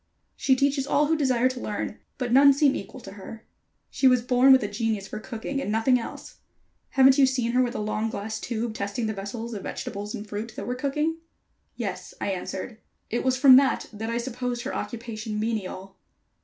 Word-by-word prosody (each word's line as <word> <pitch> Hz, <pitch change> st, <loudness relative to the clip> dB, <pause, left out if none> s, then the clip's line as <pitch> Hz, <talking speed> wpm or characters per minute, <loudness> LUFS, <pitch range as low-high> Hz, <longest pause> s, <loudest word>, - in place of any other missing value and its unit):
She 265 Hz, -, +3 dB
teaches 275 Hz, +1 st, +1 dB
all 295 Hz, -, +3 dB
who 320 Hz, +2 st, +2 dB
desire 255 Hz, -5 st, +2 dB
to 255 Hz, -1 st, -4 dB
learn, 210 Hz, -1 st, -4 dB, 0.2 s
but 250 Hz, -2 st, -3 dB
none 280 Hz, +1 st, +8 dB
seem 280 Hz, 0 st, +3 dB
to -, -, -2 dB
equal 260 Hz, -, -10 dB
her. 210 Hz, +3 st, -10 dB, 0.5 s
She 265 Hz, -, +3 dB
was 250 Hz, -2 st, +4 dB
born 250 Hz, +2 st, +5 dB
with 265 Hz, -2 st, +6 dB
a -, -, -1 dB
genius 210 Hz, -1 st, -2 dB
for 215 Hz, -, -6 dB
cooking 240 Hz, +4 st, -4 dB
and 210 Hz, -, -3 dB
nothing 225 Hz, +4 st, +3 dB
else. 230 Hz, -, -9 dB, 0.5 s
Haven't 265 Hz, 0 st, +5 dB
you 270 Hz, -, +7 dB
seen 250 Hz, -3 st, 0 dB
her 250 Hz, +1 st, +3 dB
with 245 Hz, -1 st, -1 dB
a -, -, -2 dB
long 215 Hz, +1 st, -1 dB
glass 215 Hz, +1 st, -4 dB
tube 230 Hz, -1 st, -3 dB
testing 200 Hz, +2 st, -3 dB
the 220 Hz, -, -1 dB
vessels 220 Hz, +4 st, -6 dB
of 205 Hz, -, -5 dB
vegetables 205 Hz, +2 st, -5 dB
and 210 Hz, -, -7 dB
fruit 210 Hz, +2 st, -5 dB
that -, -, -5 dB
were 250 Hz, -, -2 dB
cooking?" 300 Hz, +5 st, -1 dB, 0.6 s
"Yes," -, -, -5 dB
I 200 Hz, -, -1 dB
answered. 190 Hz, +4 st, -5 dB, 0.3 s
"It 235 Hz, -, -1 dB
was 260 Hz, -1 st, +2 dB
from 260 Hz, -1 st, +8 dB
that 275 Hz, 0 st, +2 dB
that 220 Hz, +2 st, -5 dB
I 230 Hz, -, -1 dB
supposed 245 Hz, 0 st, -3 dB
her -, -, -4 dB
occupation 220 Hz, -2 st, -5 dB
menial." 195 Hz, -3 st, -4 dB
235 Hz, 205 wpm, -26 LUFS, 215-260 Hz, 0.6 s, none